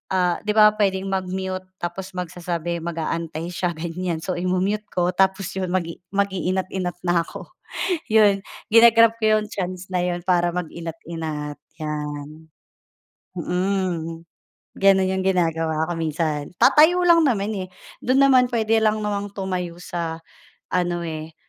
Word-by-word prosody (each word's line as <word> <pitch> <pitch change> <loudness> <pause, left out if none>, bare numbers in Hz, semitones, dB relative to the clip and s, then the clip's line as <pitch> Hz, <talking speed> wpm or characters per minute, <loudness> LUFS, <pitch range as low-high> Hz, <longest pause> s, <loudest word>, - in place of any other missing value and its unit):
ah, 180 -2 +2
'di 210 - +3
ba 210 -1 +8
pwedeng 195 -1 +1
mag-mute? 185 0 -3 0.2
Tapos 185 +2 -5
magsasabi, 175 -1 -3
mag-aantay 165 0 -3
siya 175 0 -1
ganyan. 170 0 -3
So 185 - -2
imu-mute 185 +4 0
ko 180 0 +1
tapos 190 0 +1
yon, 185 - -2
mag-i 170 -2 -2
mag-iinat-inat 190 -2 -1
na 175 -1 +2
ako. - - -10 0.6
Yun, 205 -3 +5 0.3
gina-grab 230 0 +7
ko 215 0 +4
yung 210 - -6
chance 185 -1 -4
na 180 - +1
yon 175 -1 -2
para 175 -1 +2
mag-inat-inat, 165 -3 -5 0.2
'yan. 150 0 -5 0.9
Mm. 180 -2 -2 0.5
Gano'n 195 -1 +4
'yong 190 0 -1
ginagawa 165 -3 +1
ko - - -1
minsan. 155 -2 -2
Tatayo 320 +4 +6
lang 335 -1 +6
naman, 205 -5 +1
eh, 185 -1 -4 0.4
do'n 255 +2 +3
naman 255 -1 +5
puwede 225 -1 +2
lang 215 0 +2
namang 205 -1 -3
tumayo 180 -3 -3
sa 170 -2 -4 0.5
ano, 175 -1 0
eh, 160 -1 -6
180 Hz, 135 wpm, -23 LUFS, 165-195 Hz, 0.9 s, ba